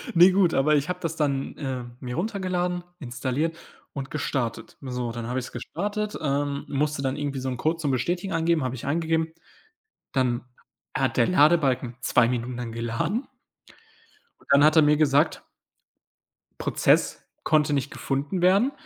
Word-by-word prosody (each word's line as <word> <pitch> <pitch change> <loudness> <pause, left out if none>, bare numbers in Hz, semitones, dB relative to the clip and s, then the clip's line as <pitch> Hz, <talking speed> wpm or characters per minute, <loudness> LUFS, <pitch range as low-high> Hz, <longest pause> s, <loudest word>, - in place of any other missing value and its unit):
Ne, 180 +3 +8
gut, 185 -3 +3
aber 150 +3 +3
ich 145 +4 0
habe 180 0 -2
das 165 -1 -2
dann, 140 -3 -1
äh, 130 -4 -3 0.2
mir 125 -2 -5
runtergeladen, 180 -2 -1 0.2
installiert 140 +5 -2 0.4
und 135 -1 -6
gestartet. 130 -6 -3
So, 125 -3 -3
dann 115 0 -5
habe 125 +2 -1
ich's 130 - -7
gestartet, 205 - -3
ähm, 140 -1 -1
musste 145 0 0
dann 135 0 -1
irgendwie 145 -2 -3
so 130 0 -3
'nen 125 - -3
Code 160 +5 0
zum 145 -4 0
Bestätigen 175 +9 -1
angeben, 165 -2 +2
habe 130 0 -2
ich 125 - -8
eingegeben. 160 +1 0 0.8
Dann 125 -2 +1 0.5
hat - - 0
der - - +4
Ladebalken 145 -7 +3
2 120 -3 +3
Minuten 125 0 -2
lang 120 -2 -5
geladen. 115 - -2 1.1
Und - - -23
dann 140 +1 +6
hat 155 +1 +5
er 160 - +8
mir 150 0 +4
gesagt 145 +1 +2 1.2
Prozess - - +2 0.2
konnte 150 -1 +3
nicht 140 -1 0
gefunden 140 +6 -2
werden, 200 +9 +4
145 Hz, 160 wpm, -25 LUFS, 130-165 Hz, 1.2 s, Ne